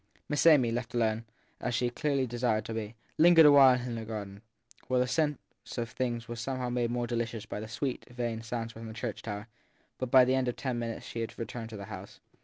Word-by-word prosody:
Miss 150 +2 +2
Amy, 135 -8 +6
left 120 +1 -3
alone, 115 -1 +1 0.3
as 125 -1 -2
she 120 0 +1
clearly 140 -1 0
desired 120 -2 0
to 115 - -5
be, 110 0 -4 0.2
lingered 165 -1 +8
awhile 135 -3 +8
in 125 -1 -4
the 115 -1 -4
garden, 105 -2 -6 0.5
where 130 -1 +2
the 125 - +3
sense 150 +2 +1 0.4
of 115 -1 -2
things 120 -1 -2
was 120 0 -5
somehow 130 0 -2
made 120 0 0
still 120 - -3
more 120 0 0
delicious 115 -2 -3
by 105 - -5
the 110 - -6
sweet, 125 +3 -3
vain 120 -2 -3
sounds 115 0 -4
from 115 0 -8
the 110 - -7
church 115 -2 -4
tower; 105 0 -5 0.5
but 130 - -2
by 130 0 +7
the 130 - +2
end 130 -1 +1
of 125 - -1
ten 130 -4 -2
minutes 115 -1 -4
she 115 - -5
had 115 - -5
returned 115 0 -5
to 110 - -7
the 100 - -7
house. - - -9
120 Hz, 230 wpm, -30 LUFS, 115-130 Hz, 0.5 s, lingered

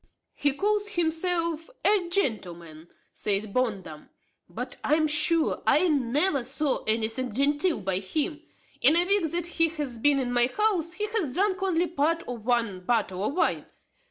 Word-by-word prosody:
"He 285 -1 0
calls 415 +5 0
himself 335 -3 -1 0.2
a 390 -5 +2
gentleman," 175 - -3 0.3
said 205 0 -2
Bondum; 195 -11 -3 0.4
"but - - -7
I 300 - +3
am 310 0 +2
sure 310 +2 +2
I 365 - +4
never 285 +2 +1
saw 275 +3 -2
anything 225 +2 -2
genteel 290 - +1
by 190 -1 -1
him. 300 - -3 0.4
In 285 +6 +5
a 345 +1 +4
week 390 -4 +1
that 345 -1 -1
he 330 -1 +1
hath 285 -8 -6
been 290 +1 +4
in 250 -2 -1
my 240 0 +4
house 380 -6 +1
he 420 +4 -3
hath 415 - -2
drank 380 0 +1
only 360 -3 +1
part 330 0 0
of 235 -2 -7
one 230 -6 +1
bottle 195 -2 -1
of 275 +8 -2
wine. 370 - 0
295 Hz, 160 wpm, -26 LUFS, 235-345 Hz, 0.4 s, In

